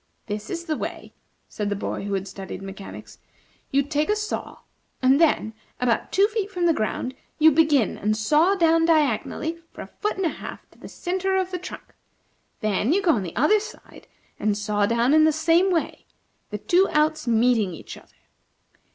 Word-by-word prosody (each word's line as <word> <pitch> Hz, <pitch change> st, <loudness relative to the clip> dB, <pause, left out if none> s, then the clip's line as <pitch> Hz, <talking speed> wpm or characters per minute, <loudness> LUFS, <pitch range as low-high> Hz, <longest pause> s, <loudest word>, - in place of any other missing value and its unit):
"This 210 Hz, 0 st, -5 dB
is 340 Hz, -1 st, -4 dB
the 315 Hz, -, -1 dB
way," -, -, -6 dB, 0.3 s
said 210 Hz, -1 st, -4 dB
the 205 Hz, -, -1 dB
boy 200 Hz, -, -4 dB
who 200 Hz, -1 st, -1 dB
had 195 Hz, 0 st, -3 dB
studied 195 Hz, -1 st, -8 dB
mechanics. 195 Hz, 0 st, -10 dB, 0.5 s
"You 280 Hz, +1 st, +2 dB
take 295 Hz, +3 st, -1 dB
a 420 Hz, -, +3 dB
saw, 425 Hz, 0 st, -5 dB, 0.4 s
and 265 Hz, +4 st, +4 dB
then, 295 Hz, -9 st, +2 dB, 0.3 s
about 245 Hz, -2 st, 0 dB
two 395 Hz, +2 st, +4 dB
feet 425 Hz, -2 st, -2 dB
from 360 Hz, -3 st, -1 dB
the 335 Hz, -, +4 dB
ground, 250 Hz, +1 st, -2 dB, 0.2 s
you 315 Hz, +1 st, +6 dB
begin 295 Hz, -, +2 dB
and 215 Hz, +1 st, 0 dB
saw 305 Hz, -, +3 dB
down 330 Hz, -2 st, +3 dB
diagonally, 310 Hz, +1 st, +1 dB
for -, -, -10 dB
a -, -, -10 dB
foot 420 Hz, -2 st, -1 dB
and 385 Hz, -, -1 dB
a -, -, +2 dB
half, -, -, -9 dB
to -, -, -23 dB
the -, -, -10 dB
centre 380 Hz, +1 st, -2 dB
of 375 Hz, -1 st, -1 dB
the 360 Hz, -, -3 dB
trunk. 365 Hz, -, -10 dB, 0.7 s
Then 215 Hz, +3 st, +1 dB
you 395 Hz, +2 st, +1 dB
go 350 Hz, -, +4 dB
on 230 Hz, -, +1 dB
the 175 Hz, -3 st, -7 dB
other 300 Hz, -, +4 dB
side, 435 Hz, -, -12 dB, 0.3 s
and 210 Hz, -1 st, 0 dB
saw 210 Hz, -1 st, 0 dB
down 235 Hz, +4 st, +2 dB
in 310 Hz, 0 st, +6 dB
the 315 Hz, -, +5 dB
same 330 Hz, +4 st, +3 dB
way, 340 Hz, -3 st, -2 dB, 0.4 s
the 210 Hz, -, -4 dB
two 360 Hz, -, +2 dB
outs 310 Hz, -1 st, +1 dB
meeting 225 Hz, -5 st, +2 dB
each -, -, -10 dB
other. -, -, -16 dB
300 Hz, 195 wpm, -24 LUFS, 215-345 Hz, 0.7 s, you